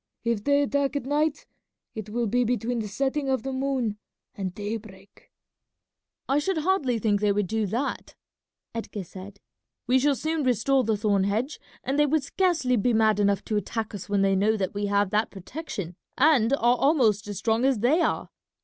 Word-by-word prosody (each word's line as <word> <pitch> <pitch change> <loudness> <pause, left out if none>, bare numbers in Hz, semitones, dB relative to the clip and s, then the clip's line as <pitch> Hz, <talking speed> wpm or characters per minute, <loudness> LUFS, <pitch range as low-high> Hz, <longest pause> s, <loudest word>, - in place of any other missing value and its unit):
If 230 -3 -1
they 285 +2 +3
attack 280 0 0
at 280 - -2
night 295 +2 0 0.5
it 215 -1 -7
will 235 +2 -1
be 245 +4 +2
between 240 0 -1
the 215 - -3
setting 275 +6 -1
of 260 -1 0
the 270 0 -3
moon 260 -6 -1 0.3
and 190 -2 -4
daybreak." 205 -1 -8 1.0
"I 275 +2 +2
should 360 +4 -1
hardly 305 -7 +1
think 210 -2 +1
they 210 -1 +3
would 205 0 +1
do 220 +2 -1
that," 240 +8 -3 0.6
Edgar 220 -3 -5
said. 190 +3 -11 0.5
"We 255 +1 +3
shall 285 +1 +2
soon 315 +3 -2
restore 255 +2 +2
the 220 -2 0
thorn 200 -2 +1
hedge, 225 +9 -1 0.2
and 270 +3 -1
they 295 - +5
would 305 0 +1
scarcely 310 -6 +1
be 235 +3 +2
mad 220 -2 +3
enough 200 -1 +1
to 215 - -1
attack 220 +2 -3
us 205 0 -7
when 200 -1 +2
they 195 0 +3
know 215 +3 +2
that 190 -2 -2
we 205 0 -2
have 200 -1 +1
that 215 +1 +1
protection 195 - -7 0.2
and 265 -5 +4
are 275 - +2 0.2
almost 235 -9 +2
as 205 -2 -5
strong 225 +3 +1
as 265 -2 +3
they 290 +9 +3
are. - - -1
230 Hz, 190 wpm, -26 LUFS, 205-275 Hz, 1.0 s, they